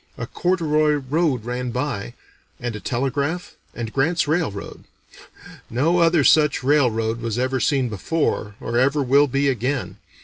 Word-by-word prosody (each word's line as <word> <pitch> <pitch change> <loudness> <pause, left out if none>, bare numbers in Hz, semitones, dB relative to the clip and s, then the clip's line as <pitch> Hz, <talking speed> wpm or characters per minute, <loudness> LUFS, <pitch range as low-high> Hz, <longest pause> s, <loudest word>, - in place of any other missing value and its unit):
A - - -4
corduroy 155 -4 +1
road 145 -3 0
ran 125 +1 -3
by, 120 -3 -3 0.4
and 120 -2 -4
a - - -5
telegraph, 140 - -2 0.2
and 115 -2 -5
Grant's 155 +4 +1
railroad. 150 - -3 0.8
No 155 +9 +1
other 165 -2 +4
such 150 -2 +4
railroad 115 -5 +1
was 115 -1 -3
ever 130 +1 0
seen 135 -1 +1
before, 110 - -2
or 120 +1 -1
ever 140 +3 +2
will 140 +3 +4
be 140 +2 0
again. 130 +1 -2
135 Hz, 140 wpm, -22 LUFS, 120-150 Hz, 0.8 s, other